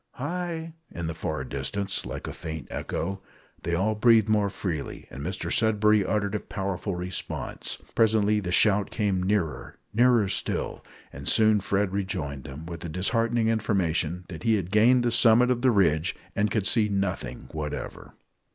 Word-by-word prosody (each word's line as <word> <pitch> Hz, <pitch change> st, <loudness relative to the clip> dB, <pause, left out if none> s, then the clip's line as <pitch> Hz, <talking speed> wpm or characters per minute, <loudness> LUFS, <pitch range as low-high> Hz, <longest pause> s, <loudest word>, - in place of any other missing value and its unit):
"Hi!" 165 Hz, +2 st, -4 dB, 0.2 s
in 85 Hz, -, -5 dB
the 80 Hz, -, -2 dB
far 75 Hz, -3 st, -3 dB
distance, 70 Hz, +10 st, -3 dB
like -, -, -6 dB
a -, -, -5 dB
faint 80 Hz, -2 st, -6 dB
echo. 95 Hz, +3 st, -3 dB, 0.4 s
They 85 Hz, -, -1 dB
all 100 Hz, +5 st, +1 dB
breathed 110 Hz, 0 st, +4 dB
more 105 Hz, -2 st, +3 dB
freely, 85 Hz, -7 st, -4 dB
and 65 Hz, -, -7 dB
Mr 85 Hz, +1 st, -4 dB
Sudberry 105 Hz, -2 st, +3 dB
uttered 100 Hz, 0 st, -1 dB
a 105 Hz, -, 0 dB
powerful 100 Hz, -1 st, -3 dB
response. 90 Hz, +1 st, -4 dB, 0.2 s
Presently 105 Hz, -2 st, +3 dB
the 90 Hz, -4 st, -4 dB
shout 100 Hz, +1 st, +4 dB
came 100 Hz, -4 st, 0 dB
nearer 90 Hz, -8 st, -1 dB, 0.2 s
nearer 120 Hz, -2 st, +4 dB
still; -, -, -2 dB, 0.3 s
and 70 Hz, +2 st, -4 dB
soon 110 Hz, -1 st, +4 dB
Fred 100 Hz, 0 st, 0 dB
rejoined 90 Hz, -9 st, -3 dB
them, 70 Hz, +4 st, -8 dB
with 85 Hz, 0 st, -6 dB
the 85 Hz, -, -6 dB
disheartening 115 Hz, +6 st, +1 dB
information 90 Hz, -6 st, 0 dB
that 80 Hz, -4 st, -7 dB
he 115 Hz, -1 st, +3 dB
had 95 Hz, -3 st, -3 dB
gained 120 Hz, +4 st, +5 dB
the 120 Hz, -, +1 dB
summit 120 Hz, +1 st, +5 dB
of 120 Hz, -1 st, 0 dB
the 130 Hz, -, +4 dB
ridge, 85 Hz, -8 st, +2 dB, 0.2 s
and 105 Hz, +1 st, +2 dB
could 105 Hz, -3 st, 0 dB
see 105 Hz, +1 st, +3 dB
nothing 100 Hz, -2 st, -2 dB
whatever! 75 Hz, -1 st, -6 dB
100 Hz, 165 wpm, -26 LUFS, 85-110 Hz, 0.4 s, gained